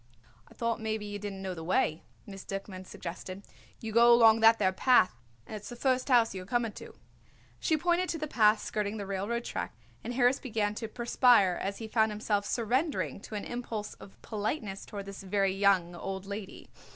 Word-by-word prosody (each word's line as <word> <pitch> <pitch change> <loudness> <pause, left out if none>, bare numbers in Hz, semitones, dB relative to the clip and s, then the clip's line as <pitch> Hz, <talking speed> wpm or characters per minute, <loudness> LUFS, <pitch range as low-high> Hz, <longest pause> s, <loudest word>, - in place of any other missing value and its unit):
"I - - -18
thought 230 -1 -1
maybe 220 -1 -2
you 205 0 -5
didn't 195 -1 -6
know 190 -1 -3
the 165 -2 -7
way," 160 -2 +1 0.2
Miss 195 -1 -9
Duckman 195 -1 -7
suggested. 185 +3 -7 0.4
"You 225 - -5
go 235 +2 +6
along 225 -2 +7
that 225 0 +6
there 190 -3 +2
path 250 -1 +4 0.3
and - - -8
it's 210 -1 -8
the 240 - -7
first 255 +1 0
house 240 -3 +4
you 190 - -5
are - - -10
coming 235 0 0
to." - - -11 0.6
She 315 - +1
pointed 350 +3 +1
to 330 - -1
the 305 - -3
path 215 -6 +3
skirting 210 0 -2
the 200 - -5
railroad 200 +5 -2
track, 115 - -5 0.3
and 240 +1 -4
Harris 250 +2 +3
began 215 -5 -1
to 225 +1 -5
perspire 235 -4 +3
as 200 +1 -3
he 225 - -6
found 220 0 +2
himself 210 -1 -1
surrendering 255 +3 -1
to 215 - -8
an 205 - -4
impulse 230 -3 -5
of 195 - -15
politeness 210 -2 -4
toward 200 -1 -7
this 195 0 -8
very 195 0 +1
young 195 -3 +2
old 190 +2 -5
lady. 200 0 -8
210 Hz, 200 wpm, -30 LUFS, 195-235 Hz, 0.6 s, along